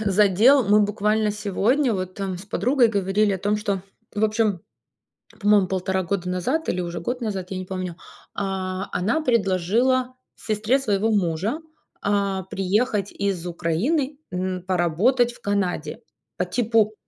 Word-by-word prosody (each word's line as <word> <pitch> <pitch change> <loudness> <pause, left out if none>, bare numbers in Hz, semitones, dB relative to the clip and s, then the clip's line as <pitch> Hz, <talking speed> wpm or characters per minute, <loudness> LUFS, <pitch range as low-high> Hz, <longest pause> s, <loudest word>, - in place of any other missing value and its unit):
задел. 210 +6 +4
Мы 210 +1 +5
буквально 210 +1 +1
сегодня 215 +6 +1
вот 185 -1 -3
там 195 -2 -4
с 195 - -11
подругой 240 +6 +2
говорили 200 0 +1
о 190 - -2
том, 205 +3 0
что, 200 -3 -2 0.3
в 210 +1 +1
общем, 215 -4 +1 0.8
по-моему, 205 -3 +4
полтора 190 0 -1
года 180 0 -2
назад 250 - -1
или 180 - -1
уже 170 0 -5
год 245 +8 -3
назад, 195 -5 -4
я 190 - -3
не 185 - -5
помню, 185 -2 -5 0.4
а, 190 -1 -3
она 225 - +1
предложила 235 - +1 0.2
сестре 220 +4 0
своего 220 -3 +1
мужа, 195 - 0 0.4
а, 200 -2 0
приехать 200 +2 0
из 195 -4 -2
Украины, 220 - -1
м, 185 0 -3
поработать 190 +8 +2
в - - -18
Канаде. 180 -6 -2 0.4
По 180 - 0
типу: 220 +2 +1
200 Hz, 145 wpm, -23 LUFS, 185-220 Hz, 0.8 s, Мы